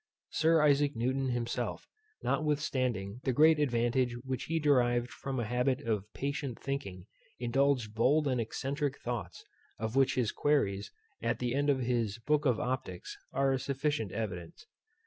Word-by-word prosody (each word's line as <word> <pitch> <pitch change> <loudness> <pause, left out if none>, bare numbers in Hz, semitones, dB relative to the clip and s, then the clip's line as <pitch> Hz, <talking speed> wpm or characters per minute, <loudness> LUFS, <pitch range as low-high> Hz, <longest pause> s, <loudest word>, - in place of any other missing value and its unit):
Sir 160 -1 +4
Isaac 145 -1 +3
Newton 130 +3 0
himself, 120 -1 -2 0.4
notwithstanding 130 -8 0
the 130 - +1
great 155 +4 +5
advantage 120 -2 +1
which 130 -1 -3
he 165 - -1
derived 125 -5 +3
from 135 -1 -4
a 120 - -1
habit 125 +3 +1
of 105 -2 -2
patient 140 -3 -3
thinking, 100 -10 -4 0.3
indulged 125 -2 +1
bold 140 +7 +3
and 125 -3 +1
excentric 135 +4 -2
thoughts, 120 -1 -5 0.3
of 110 +2 -3
which 135 -1 +4
his 125 -5 +1
Queries 100 -10 +1 0.3
at 115 +1 0
the 125 -1 -1
end 145 +2 +1
of 135 -2 +2
his 120 -4 0
book 150 +5 +1
of 120 -4 +2
Optics 125 -8 -3 0.2
are 135 0 +2
a 135 - +1
sufficient 140 -5 -1
evidence. 95 -6 -5
130 Hz, 150 wpm, -31 LUFS, 115-140 Hz, 0.4 s, great